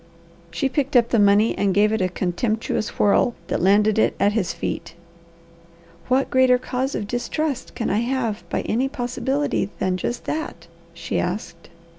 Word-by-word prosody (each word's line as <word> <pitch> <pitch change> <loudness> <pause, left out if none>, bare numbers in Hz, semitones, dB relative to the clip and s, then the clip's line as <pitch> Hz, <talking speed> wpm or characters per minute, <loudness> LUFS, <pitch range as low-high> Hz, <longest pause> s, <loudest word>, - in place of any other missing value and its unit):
She 170 +11 -1
picked 270 0 -2
up 235 -1 +5
the 230 - +2
money 205 +2 +4
and 195 -2 0
gave 210 +1 +4
it 220 - 0
a 185 - +1
contemptuous 215 +5 -2
whirl 205 +3 +3
that - - -1
landed 210 +3 +4
it - - +2
at 205 - +3
his 210 -4 -1
feet. 170 - -5 1.1
"What 260 +2 +1
greater 260 -1 +5
cause 255 +2 -3
of 205 - -2
distrust 260 +5 -3
could 230 - -2
I 210 - +2
have 235 -3 -1
by - - -1
any 255 +5 0
possibility 265 -2 -1
than 185 -1 0
just 240 +6 -4
that?" 305 - -4 0.3
she - - -3
asked. 175 -2 -4
225 Hz, 165 wpm, -22 LUFS, 200-255 Hz, 1.1 s, up